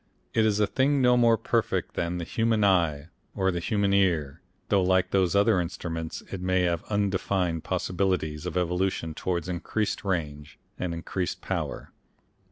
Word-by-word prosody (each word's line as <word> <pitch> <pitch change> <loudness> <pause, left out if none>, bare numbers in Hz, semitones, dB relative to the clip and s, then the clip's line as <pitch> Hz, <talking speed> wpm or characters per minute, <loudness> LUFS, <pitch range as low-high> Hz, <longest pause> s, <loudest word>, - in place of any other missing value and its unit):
It 110 -1 +3
is 105 -1 +1
a 105 - +4
thing 135 +7 +1
no 125 -1 +5
more 115 -2 +4
perfect - - -1
than 85 +1 -2
the 85 - -3
human 115 +3 +1
eye 85 -6 +2 0.3
or 95 0 +1
the 85 - -2
human 100 +2 0
ear, 85 -7 +1 0.3
though 100 -2 +4
like 95 0 +2
those 95 -1 +2
other 100 -2 +4
instruments 85 -2 -5
it 95 - -5
may 95 0 +1
have 85 -2 0
undefined 95 -4 0
possibilities 90 -4 -1
of 90 - -3
evolution 90 -2 -1
towards 85 0 -2
increased 90 +4 -2
range, 75 -6 -3 0.2
and 85 -2 -2
increased 90 +2 -3
power. - - -4
90 Hz, 160 wpm, -27 LUFS, 85-100 Hz, 0.3 s, no